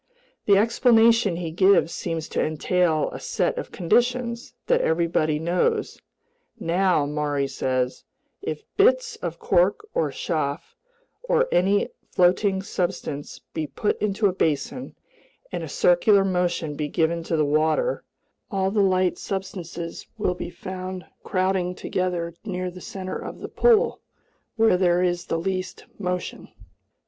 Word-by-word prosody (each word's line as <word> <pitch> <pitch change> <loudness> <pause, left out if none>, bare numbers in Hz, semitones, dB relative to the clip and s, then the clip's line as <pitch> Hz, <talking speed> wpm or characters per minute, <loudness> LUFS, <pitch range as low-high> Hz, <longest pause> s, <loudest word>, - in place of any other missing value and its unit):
The 200 -1 +6
explanation 230 -2 +4
he 170 -1 -4
gives 185 0 +4
seems 165 -2 -3
to - - 0
entail 155 +1 +1
a - - -7
set - - -1
of - - -7
conditions 240 - 0
that - - +3
everybody 160 -2 +1
knows: 180 - 0 0.6
"Now," 175 -2 +2
Maury 145 -1 -1
says, 130 -1 -2 0.4
"if - - -4
bits 470 +2 +3
of - - -5
cork 435 -4 +2
or - - +1
chaff, - - -3 0.5
or - - +2
any 195 +3 +2 0.2
floating 190 +2 +2
substance, 175 -6 -3
be 155 -1 -2
put 140 +9 -2
into 210 0 0
a 195 - +3
basin, 170 - -2 0.6
and - - -3
a - - -6
circular 215 - +4
motion 175 -5 -1
be 150 0 -2
given 165 +2 0
to 165 0 -2
the 155 - +3
water, 155 - +1 0.5
all 195 -2 0
the 210 0 +2
light 185 -2 +2
substances 175 -3 -5
will 205 -4 0
be 180 - -6
found 185 0 -6 0.2
crowding 185 -1 0
together 175 -2 -2
near 185 -3 -3
the 180 +1 -11
center 185 -1 -5
of - - -7
the - - -7
pool, 475 0 +3 0.5
where 225 -5 +4
there 180 -1 +3
is 175 -1 0
the 165 - 0
least 185 +2 -3
motion. 180 -2 -3
185 Hz, 135 wpm, -24 LUFS, 170-210 Hz, 0.6 s, The